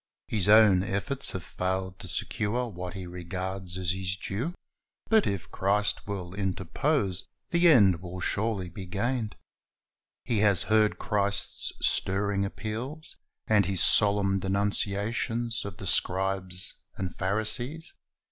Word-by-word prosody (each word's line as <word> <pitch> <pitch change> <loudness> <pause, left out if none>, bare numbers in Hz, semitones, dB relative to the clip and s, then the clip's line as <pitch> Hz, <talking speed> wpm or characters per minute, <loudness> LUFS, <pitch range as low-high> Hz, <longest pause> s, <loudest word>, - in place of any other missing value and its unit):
His 105 -3 0
own 105 -4 +7
efforts 115 +9 -1
have 95 - -4
failed 95 +1 -3
to - - -8
secure 110 +7 -1
what 90 -3 -6
he 95 -2 -5
regards 90 +1 -5
as 90 -2 0
his 95 0 -2
due; 120 - -3 0.6
but 220 -2 +5
if 100 -4 -3
Christ 105 +2 +1
will 95 -3 -4
interpose, 95 - -1 0.2
the 170 +1 +5
end 100 - +6
will 90 0 -7
surely 105 0 -1
be 95 +2 -8
gained. 110 +3 -1 0.9
He 115 -4 0
has 100 -3 +4
heard 110 -1 +3
Christ's 100 -2 -1 0.2
stirring 100 +1 +1
appeals, 120 +10 -5 0.3
and 105 -4 +3
His 95 -2 +2
solemn 100 -2 +4
denunciations 105 +4 -1
of 100 -3 -7
the 95 - -8
scribes 95 0 0 0.2
and 95 -2 -4
Pharisees. 120 - -1
100 Hz, 130 wpm, -28 LUFS, 95-110 Hz, 0.9 s, own